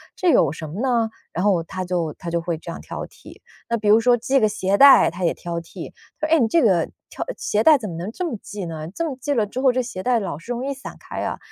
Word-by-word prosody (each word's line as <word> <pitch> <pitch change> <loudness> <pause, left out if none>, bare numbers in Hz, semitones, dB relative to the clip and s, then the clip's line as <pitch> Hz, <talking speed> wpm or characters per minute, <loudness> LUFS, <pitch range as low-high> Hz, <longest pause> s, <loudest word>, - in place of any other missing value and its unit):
这 365 - +1
有 160 - +4
什 160 0 -7
么 170 +7 -7
呢？” 235 -3 +1 0.2
然 180 - -2
后 190 -5 +2
他 185 +2 -5
就 175 -4 -2
他 175 - -7
就 170 0 0
会 165 -1 -3
这 170 - -8
样 - - -7
挑 - - -6
剔。 - - -15 0.4
那 235 - +1
比 210 -1 -3
如 220 +2 +6
说 245 0 +4
系 265 +4 +1
个 215 - +4
鞋 200 -1 0
带， 280 -9 +8
他 175 +2 -6
也 170 - +2
挑 170 -1 -5
剔， 165 - -10 0.3
“哎， 325 +1 +4
你 235 - +3
这 335 - +3
个 185 -8 +3 0.2
挑 - - -5
鞋 210 +1 0
带 310 +1 +7
怎 215 -6 -6
么 165 - -6
能 180 +6 -5
这 360 - -4
么 230 - -4
系 200 -3 -6
呢？ 160 -1 -6
这 335 - -2
么 260 - -6
系 285 +1 0
了 220 -5 +1
之 250 +5 -4
后， 265 -2 +5
这 255 +1 0
鞋 190 -6 -6
带 245 -2 +2
老 185 -8 -4
是 230 +9 -9
容 245 +2 -3
易 280 - -2
散 270 - -10
开 - - -6
啊。” - - -3
210 Hz, 300 characters per minute, -22 LUFS, 170-250 Hz, 0.4 s, 带